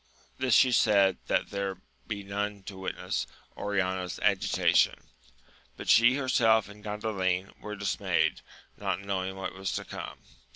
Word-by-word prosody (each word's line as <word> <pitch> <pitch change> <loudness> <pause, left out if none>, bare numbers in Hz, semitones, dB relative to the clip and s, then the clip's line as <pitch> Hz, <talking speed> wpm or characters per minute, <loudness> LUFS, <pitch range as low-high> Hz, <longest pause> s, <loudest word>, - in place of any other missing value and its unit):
This 130 -3 +3
she 130 - +6
said 100 -5 +4
that - - 0
there 100 -1 -2
might 95 - -29 0.2
be 100 -2 -4
none 100 0 -3
to 95 - -8
witness 95 - -3 0.3
Oriana's 95 -3 -1
agitation; - - +2 0.7
but - - -6
she 120 +3 +6
herself 115 -6 +3
and 105 0 -13
Gandalin 95 -3 -2
were 105 0 -6
dismayed, 100 -2 0 0.3
not 90 - -2
knowing 95 -1 -3
what 95 - -5
was 95 -2 -3
to - - -3
come. - - -7
100 Hz, 140 wpm, -29 LUFS, 95-105 Hz, 0.7 s, she